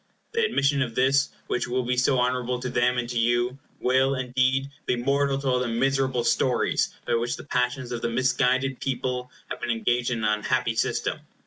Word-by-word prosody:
The 460 Hz, +1 st, +1 dB
admission 140 Hz, -, +2 dB
of 120 Hz, -4 st, -2 dB
this, 135 Hz, +2 st, +3 dB, 0.2 s
which 120 Hz, -, -1 dB
will 125 Hz, +1 st, -1 dB
be 125 Hz, +1 st, 0 dB
so 125 Hz, +2 st, +2 dB
honorable 125 Hz, 0 st, 0 dB
to 125 Hz, -, -3 dB
them 125 Hz, +1 st, +2 dB
and 120 Hz, -1 st, -1 dB
to 120 Hz, -1 st, -2 dB
you, 120 Hz, +3 st, +1 dB, 0.2 s
will, 130 Hz, +2 st, +2 dB
indeed, 130 Hz, +1 st, 0 dB, 0.2 s
be -, -, +2 dB
mortal 140 Hz, +2 st, +1 dB
to 140 Hz, 0 st, -4 dB
all 125 Hz, -1 st, +2 dB
the 125 Hz, -, -1 dB
miserable 130 Hz, +1 st, +1 dB
stories 120 Hz, +1 st, +1 dB, 0.2 s
by 120 Hz, -, -1 dB
which 120 Hz, +1 st, 0 dB
the -, -, -10 dB
passions 125 Hz, -1 st, -1 dB
of 120 Hz, -1 st, -3 dB
the 120 Hz, -, -1 dB
misguided 130 Hz, +2 st, +1 dB
people 125 Hz, -1 st, -2 dB, 0.2 s
have -, -, -5 dB
been 120 Hz, -, -3 dB
engaged 120 Hz, +1 st, +1 dB
in 115 Hz, -3 st, -2 dB
an 105 Hz, 0 st, +2 dB
unhappy 115 Hz, +1 st, 0 dB
system. -, -, -1 dB
125 Hz, 200 wpm, -25 LUFS, 120-135 Hz, 0.2 s, this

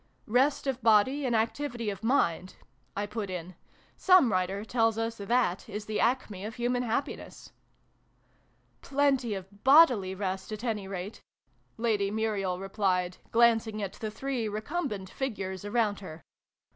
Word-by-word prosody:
" -, -, -40 dB
Rest 260 Hz, +7 st, +2 dB
of 265 Hz, -2 st, -2 dB
body, 235 Hz, +6 st, +4 dB
and 240 Hz, -, +1 dB
activity 235 Hz, 0 st, -1 dB
of 200 Hz, +2 st, -9 dB
mind," 185 Hz, -, +1 dB, 0.4 s
I 205 Hz, -, 0 dB
put 210 Hz, -1 st, -5 dB
in. 180 Hz, 0 st, -6 dB, 0.2 s
" -, -, -31 dB
Some 365 Hz, -, +5 dB
writer 190 Hz, +2 st, -1 dB
tells 225 Hz, -1 st, +1 dB
us 225 Hz, 0 st, -2 dB
that 215 Hz, -2 st, 0 dB
is 210 Hz, 0 st, -5 dB
the 215 Hz, 0 st, -2 dB
acme 230 Hz, -6 st, 0 dB
of 215 Hz, +1 st, -6 dB
human 245 Hz, +1 st, 0 dB
happiness." 250 Hz, +4 st, -4 dB, 0.7 s
" -, -, -39 dB
Plenty 270 Hz, -5 st, +1 dB
of 195 Hz, +2 st, -10 dB
bodily 255 Hz, -, +6 dB
rest, 190 Hz, 0 st, -4 dB
at 215 Hz, +2 st, -6 dB
any 215 Hz, -5 st, -2 dB
rate! 195 Hz, +2 st, -6 dB, 0.3 s
" -, -, -40 dB
Lady 205 Hz, -3 st, +1 dB
Muriel 205 Hz, -4 st, -1 dB
replied, 185 Hz, -2 st, -1 dB
glancing 225 Hz, -2 st, +3 dB
at 195 Hz, -, -4 dB
the 220 Hz, -, -5 dB
three 250 Hz, +1 st, -3 dB
recum 280 Hz, +12 st, -2 dB
bent 195 Hz, -2 st, -6 dB
figures 195 Hz, -8 st, -4 dB
around 205 Hz, -1 st, 0 dB
her. 165 Hz, -4 st, -10 dB
215 Hz, 160 wpm, -29 LUFS, 195-245 Hz, 0.7 s, bodily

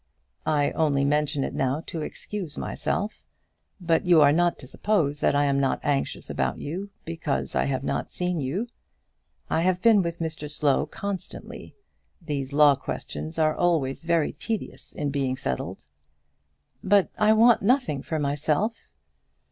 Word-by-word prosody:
"I 145 Hz, -2 st, +2 dB
only 140 Hz, -3 st, +1 dB
mention 145 Hz, 0 st, +1 dB
it -, -, -3 dB
now 135 Hz, +3 st, 0 dB
to 165 Hz, -3 st, -5 dB
excuse 180 Hz, 0 st, -6 dB
myself. 205 Hz, +3 st, -3 dB, 0.6 s
But 165 Hz, -3 st, +1 dB
you 175 Hz, -3 st, +5 dB
are 145 Hz, -1 st, +7 dB
not 175 Hz, +3 st, +2 dB
to 130 Hz, -, -12 dB
suppose 155 Hz, -5 st, 0 dB
that -, -, +2 dB
I 145 Hz, 0 st, +3 dB
am 140 Hz, -1 st, +2 dB
not 135 Hz, -1 st, +1 dB
anxious 140 Hz, -2 st, -1 dB
about -, -, -1 dB
you, 185 Hz, +7 st, -5 dB, 0.2 s
because 160 Hz, -3 st, -2 dB
I -, -, +1 dB
have 135 Hz, -1 st, -1 dB
not -, -, -2 dB
seen 180 Hz, -1 st, -2 dB
you. 180 Hz, -, -2 dB, 0.8 s
I 160 Hz, -, +1 dB
have 180 Hz, +1 st, +2 dB
been 215 Hz, 0 st, +5 dB
with 170 Hz, -1 st, -3 dB
Mr 160 Hz, -2 st, -4 dB
Slow 145 Hz, -2 st, +2 dB
constantly. 200 Hz, -2 st, -7 dB, 0.4 s
These 145 Hz, -6 st, -4 dB
law 145 Hz, 0 st, +6 dB
questions 80 Hz, -, -5 dB
are 155 Hz, -1 st, +3 dB
always 160 Hz, -6 st, +1 dB
very 165 Hz, -2 st, +1 dB
tedious 225 Hz, -2 st, -5 dB
in 145 Hz, -2 st, -2 dB
being 135 Hz, -2 st, -1 dB
settled." 65 Hz, -, -4 dB, 1.0 s
"But 200 Hz, 0 st, +3 dB
I 215 Hz, +1 st, +5 dB
want 230 Hz, +2 st, +5 dB
nothing 225 Hz, -, +2 dB
for 160 Hz, -, -3 dB
myself." 150 Hz, +9 st, -1 dB
155 Hz, 155 wpm, -26 LUFS, 140-180 Hz, 1.0 s, are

